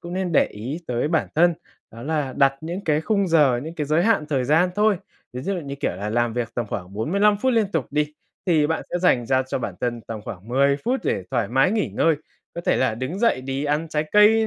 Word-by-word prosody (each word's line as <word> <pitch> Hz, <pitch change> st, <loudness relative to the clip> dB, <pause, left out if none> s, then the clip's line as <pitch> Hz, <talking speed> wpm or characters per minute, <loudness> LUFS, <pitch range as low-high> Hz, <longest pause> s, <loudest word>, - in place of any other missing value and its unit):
cũng 170 Hz, 0 st, -8 dB
nên 185 Hz, -2 st, -2 dB
để -, -, +4 dB
ý 125 Hz, +10 st, -6 dB
tới 125 Hz, +4 st, -1 dB
bản 160 Hz, -2 st, +1 dB
thân, 175 Hz, +2 st, +4 dB, 0.4 s
đó 115 Hz, +1 st, -11 dB
là 145 Hz, -2 st, -1 dB
đặt 135 Hz, 0 st, +4 dB
những 170 Hz, +4 st, -4 dB
cái 150 Hz, -1 st, +2 dB
khung 200 Hz, +3 st, +1 dB
giờ, 145 Hz, -7 st, +4 dB
những 160 Hz, +2 st, -7 dB
cái 150 Hz, -3 st, -3 dB
giới 155 Hz, +3 st, +2 dB
hạn 215 Hz, -9 st, +2 dB
thời 135 Hz, -4 st, 0 dB
gian 160 Hz, +7 st, +3 dB
thôi. 210 Hz, -1 st, +3 dB, 0.4 s
Ví 125 Hz, -, -5 dB
dụ 195 Hz, +5 st, -1 dB
như, 140 Hz, -6 st, -5 dB
kiểu -, -, 0 dB
là, 105 Hz, +2 st, -4 dB
làm 120 Hz, +1 st, +1 dB
việc 120 Hz, -1 st, -2 dB
tầm 120 Hz, -2 st, -2 dB
khoảng 90 Hz, -2 st, -6 dB
45 200 Hz, -, +2 dB
phút 260 Hz, 0 st, +3 dB
liên 225 Hz, -3 st, +3 dB
tục 155 Hz, -8 st, 0 dB
đi, 150 Hz, +1 st, 0 dB, 0.3 s
thì 155 Hz, -4 st, +3 dB
bạn 160 Hz, +1 st, -1 dB
sẽ 175 Hz, -, -1 dB
dành 130 Hz, -10 st, +2 dB
ra 130 Hz, +2 st, +2 dB
cho -, -, -1 dB
bản 100 Hz, -7 st, -4 dB
thân 120 Hz, -1 st, -2 dB
tầm 110 Hz, -1 st, -7 dB
khoảng 95 Hz, +4 st, -9 dB
10 140 Hz, +3 st, +3 dB
phút 255 Hz, +3 st, 0 dB
để 95 Hz, -, -1 dB
thoải 115 Hz, -4 st, 0 dB
mái 135 Hz, +8 st, +3 dB
nghỉ 220 Hz, -1 st, 0 dB
ngơi. 165 Hz, -2 st, +3 dB, 0.4 s
Có 170 Hz, -, -4 dB
thể -, -, +1 dB
là 130 Hz, -4 st, +1 dB
đứng 130 Hz, -, -4 dB
dậy 230 Hz, -, +2 dB
đi 135 Hz, +2 st, -3 dB
ăn 150 Hz, +3 st, 0 dB
trái 155 Hz, -1 st, -1 dB
cây 220 Hz, +2 st, +6 dB
150 Hz, 255 wpm, -23 LUFS, 125-175 Hz, 0.4 s, cây